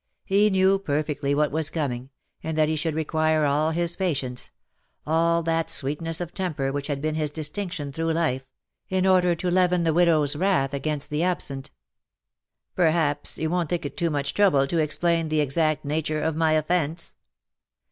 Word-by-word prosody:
He 205 +2 +3
knew 190 0 +3
perfectly 145 -4 -1
what 150 0 +1
was 155 +1 0
coming, 130 -6 -3 0.3
and 160 -1 -4
that 155 -1 +4
he 160 - 0
should 155 0 -2
require 155 0 +1
all 150 +2 +2
his 170 +1 0
patience 140 -9 -2 0.3
— - - -45
all 165 +2 +2
that 165 0 0
sweetness 160 +4 -1
ot 175 -1 -5
temper 155 -8 -2
which 140 0 -3
had 145 -1 -3
been 155 0 0
his 155 -1 -1
distinction 155 +1 -3
through 165 +3 -1
life 155 -6 0 0.3
— - - -59
in 185 -1 +1
order 180 -2 +4
to 180 +2 -2
leaven 180 -1 +3
the 165 -1 +2
widow^s 155 -4 +3
wrath 180 -9 +1
against 150 +1 -3
the 150 +1 0
absent. 160 -7 -2 0.5
" - - -60
Perhaps, 160 -4 +1
you 160 0 -2
won't 175 -3 0
think 175 -3 -2
it 145 - -5
too 170 - 0
much 140 -2 -2
trouble 180 -10 +4
to 165 +4 -1
explain 165 +2 +1
the 155 0 0
exact 155 +2 0
nature 155 +1 -1
of 160 -1 0
my 160 -1 +2
offence 160 +1 -1
160 Hz, 185 wpm, -25 LUFS, 145-170 Hz, 0.5 s, that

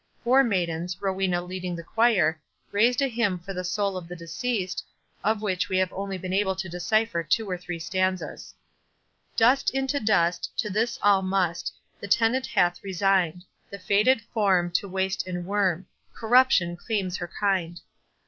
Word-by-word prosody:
Four 260 +3 +5
maidens, 175 -5 -1
Rowena 190 -2 0
leading 180 0 -5
the 170 - -7
choir, 180 -7 +2 0.3
raised 240 +6 +3
a - - +3
hymn 230 -6 0
for 180 +3 -8
the 180 0 -4
soul 200 +2 -1
of 175 -2 -7
the 180 - -7
deceased, 185 +4 -3 0.4
of 215 0 0
which 185 -3 -1
we 185 - +1
have 185 -1 +1
only 195 0 -4
been 185 0 -5
able 190 -1 +1
to 190 0 -4
decipher 180 +2 0
two 200 +8 0
or 185 - -2
three 175 -1 -6
stanzas:— 185 +2 -2 0.8
Dust 245 +4 +4
unto 270 +1 0
dust, 175 -6 +1
To 215 -4 -1
this 225 +4 0
all 200 -2 +5
must; 185 -3 -1 0.3
The 200 - -7
tenant 235 +5 +2
hath 175 0 +1
resign'd 185 -3 +1 0.3
The 200 - -7
faded 210 +6 +2
form 190 -5 +2
To 195 +3 -1
waste 190 +1 -1
and 175 -1 -4
worm— 190 -2 0 0.3
Corruption 225 -7 +3
claims 190 -1 -2
her 175 - -5
kind. 180 -4 0
190 Hz, 165 wpm, -26 LUFS, 175-215 Hz, 0.8 s, Four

